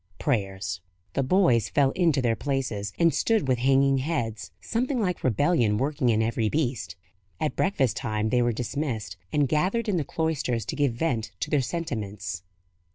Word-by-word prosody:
Prayers." 95 Hz, -, -1 dB, 0.3 s
The -, -, +1 dB
boys 130 Hz, -, +3 dB
fell 140 Hz, -2 st, +3 dB
into 160 Hz, -7 st, +2 dB
their 115 Hz, -2 st, +2 dB
places, 125 Hz, -7 st, -2 dB
and 170 Hz, -1 st, +4 dB
stood 220 Hz, -10 st, +1 dB
with 125 Hz, -2 st, +2 dB
hanging 135 Hz, +1 st, +4 dB
heads, 115 Hz, -, -2 dB
something 250 Hz, +3 st, -1 dB
like 180 Hz, -5 st, -1 dB
rebellion 120 Hz, -, +2 dB
working 135 Hz, 0 st, 0 dB
in 110 Hz, -1 st, +3 dB
every 110 Hz, -1 st, 0 dB
breast. 125 Hz, -, -1 dB, 0.4 s
At 155 Hz, -1 st, -1 dB
breakfast 140 Hz, -, +1 dB
time 110 Hz, -1 st, -1 dB
they 125 Hz, +2 st, +3 dB
were 120 Hz, 0 st, +2 dB
dismissed, 120 Hz, -, -3 dB, 0.2 s
and 145 Hz, -2 st, +2 dB
gathered 185 Hz, -, +1 dB
in 200 Hz, -4 st, +1 dB
the 160 Hz, -, 0 dB
cloisters 140 Hz, -8 st, -1 dB
to -, -, -3 dB
give 140 Hz, -4 st, +1 dB
vent 115 Hz, -, -1 dB
to -, -, -2 dB
their 145 Hz, -3 st, +3 dB
sentiments. 105 Hz, -, -4 dB
130 Hz, 165 wpm, -26 LUFS, 110-155 Hz, 0.4 s, and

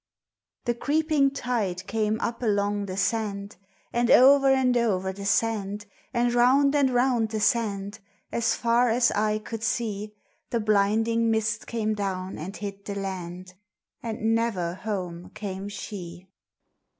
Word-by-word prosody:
The 240 Hz, -, +1 dB
creeping 295 Hz, +2 st, +2 dB
tide 220 Hz, -9 st, -2 dB
came 220 Hz, +1 st, 0 dB
up 235 Hz, -, -3 dB
along 205 Hz, -2 st, 0 dB
the 185 Hz, 0 st, -5 dB
sand, 200 Hz, -2 st, -2 dB, 0.4 s
And 240 Hz, 0 st, +1 dB
o'er 275 Hz, +2 st, +7 dB
and 260 Hz, -2 st, +3 dB
o'er 190 Hz, -5 st, +1 dB
the 200 Hz, +1 st, -6 dB
sand, 210 Hz, -2 st, 0 dB, 0.3 s
And 240 Hz, 0 st, +1 dB
round 270 Hz, +4 st, +4 dB
and 280 Hz, -2 st, +4 dB
round 245 Hz, -3 st, +2 dB
the 220 Hz, -1 st, -2 dB
sand, 205 Hz, -2 st, 0 dB, 0.3 s
As 230 Hz, 0 st, +1 dB
far 235 Hz, +1 st, +2 dB
as 240 Hz, +2 st, +3 dB
eye 215 Hz, +1 st, +1 dB
could 220 Hz, +1 st, -7 dB
see; 215 Hz, -3 st, -2 dB, 0.3 s
The 235 Hz, -, 0 dB
blinding 220 Hz, +2 st, +2 dB
mist 220 Hz, 0 st, 0 dB
came 220 Hz, -2 st, -1 dB
down 190 Hz, -2 st, -3 dB
and 185 Hz, +6 st, -6 dB
hid 200 Hz, -1 st, -6 dB
the 200 Hz, -, -4 dB
land: 185 Hz, -2 st, -6 dB, 0.5 s
And 225 Hz, -1 st, -1 dB
never 210 Hz, -7 st, 0 dB
home 180 Hz, -4 st, -5 dB
came 195 Hz, -1 st, -5 dB
she. 185 Hz, -4 st, -8 dB
215 Hz, 140 wpm, -26 LUFS, 200-235 Hz, 0.5 s, o'er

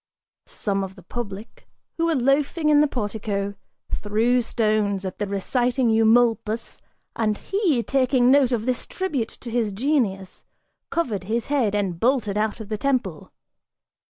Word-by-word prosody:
Some 195 Hz, -2 st, -2 dB
of 190 Hz, 0 st, -7 dB
the 185 Hz, -, -15 dB
public, 210 Hz, +1 st, -7 dB, 0.3 s
who 335 Hz, 0 st, +1 dB
were 330 Hz, -, +2 dB
loafing 285 Hz, +4 st, +1 dB
in 295 Hz, -1 st, +6 dB
the 300 Hz, -, +4 dB
portico, 205 Hz, -4 st, -3 dB, 0.4 s
threw 225 Hz, +4 st, +1 dB
stones 215 Hz, -4 st, 0 dB
at 185 Hz, -, -6 dB
the 205 Hz, -, -1 dB
reciting 240 Hz, +5 st, +1 dB
Eumolpus 225 Hz, 0 st, +2 dB, 0.3 s
and 215 Hz, -2 st, 0 dB
he, 360 Hz, -, 0 dB
taking 255 Hz, -1 st, +3 dB
note 270 Hz, -2 st, +4 dB
of 230 Hz, -3 st, -1 dB
this 250 Hz, -2 st, -2 dB
tribute 300 Hz, -12 st, -2 dB
to 240 Hz, -, -7 dB
his 230 Hz, -3 st, 0 dB
genius, 205 Hz, -5 st, -1 dB, 0.5 s
covered 220 Hz, -, -2 dB
his 225 Hz, +3 st, -1 dB
head 230 Hz, -8 st, +2 dB
and 190 Hz, -5 st, -1 dB
bolted 235 Hz, -4 st, +1 dB
out 215 Hz, +2 st, -1 dB
of 215 Hz, -2 st, -8 dB
the 215 Hz, -1 st, -3 dB
temple. 245 Hz, -, -1 dB
230 Hz, 150 wpm, -23 LUFS, 205-260 Hz, 0.5 s, in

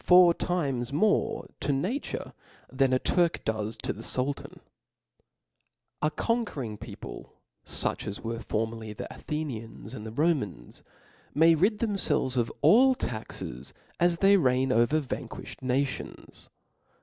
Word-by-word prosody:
four 180 Hz, -1 st, +7 dB
times 140 Hz, -10 st, -1 dB
more 205 Hz, +9 st, +1 dB
to -, -, 0 dB
nature, 190 Hz, -, -2 dB, 0.4 s
than 130 Hz, 0 st, +2 dB
a 130 Hz, -, +4 dB
Turk 170 Hz, +5 st, +1 dB
does 110 Hz, 0 st, -2 dB
tQ -, -, -3 dB
the -, -, -7 dB
Sultan, 135 Hz, +4 st, -3 dB
♦ -, -, -30 dB, 1.4 s
A 150 Hz, -, +3 dB
conquering 155 Hz, -, -2 dB
people, 105 Hz, -, -9 dB, 0.3 s
fuch -, -, 0 dB
as 100 Hz, -, -3 dB
\irere 115 Hz, 0 st, -5 dB
fornricriy 110 Hz, 0 st, -3 dB
the -, -, -5 dB
Athenians 125 Hz, -7 st, -5 dB
and 105 Hz, -, -7 dB
the 110 Hz, -, -6 dB
Romans, 115 Hz, -, -1 dB, 0.5 s
may 165 Hz, +3 st, +6 dB
rid 195 Hz, +7 st, +3 dB
ihemfelves 200 Hz, -, +1 dB
of 120 Hz, -2 st, +1 dB
all 260 Hz, +4 st, +6 dB
taxes, 70 Hz, -, -6 dB, 0.2 s
as 175 Hz, 0 st, +3 dB
they 200 Hz, +2 st, +6 dB
reign 130 Hz, -4 st, +2 dB
over 120 Hz, +6 st, +3 dB
vanquifhed 140 Hz, -4 st, -6 dB
nations. 130 Hz, +2 st, -3 dB
135 Hz, 130 wpm, -28 LUFS, 115-175 Hz, 1.4 s, four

